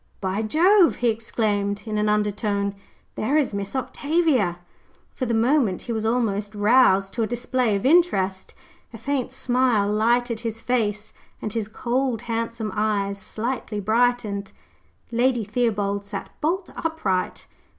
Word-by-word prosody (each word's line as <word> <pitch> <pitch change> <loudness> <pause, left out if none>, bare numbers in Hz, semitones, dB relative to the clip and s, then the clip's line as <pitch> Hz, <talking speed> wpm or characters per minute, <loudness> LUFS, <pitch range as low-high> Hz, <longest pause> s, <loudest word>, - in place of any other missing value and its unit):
"By 190 +2 -1
Jove!" 345 - +4
he 245 - +1
exclaimed, 205 -3 -1
in 215 -1 -2
an 210 0 +1
undertone, 210 -1 0 0.4
"there 275 +8 0
is 285 -7 +1
Miss 200 +3 -4
Octavia." 270 - +1 0.6
For 255 - -3
the 230 - +1
moment 230 -4 +2
he - - -5
was 220 -1 -1
almost 215 -3 -1
roused 205 -3 +4
to 235 - -2
a 220 - +1
display 240 -1 0
of 200 - -3
interest. 200 - +2 0.4
A - - -7
faint 260 +2 -2
smile 250 -5 +2
lighted 235 +2 +1
his 225 -1 -4
face, 220 -3 -1 0.3
and 215 - -5
his 225 -3 -2
cold, 240 +1 -1
handsome 230 -2 -3
eyes 200 -2 0
slightly 220 0 -4
brightened. 220 -2 0 0.6
Lady 240 0 +2
Theobald 205 -2 -1
sat 200 -1 -7
bolt 350 +5 -1
upright. 215 - -2
225 Hz, 140 wpm, -24 LUFS, 205-250 Hz, 0.6 s, Jove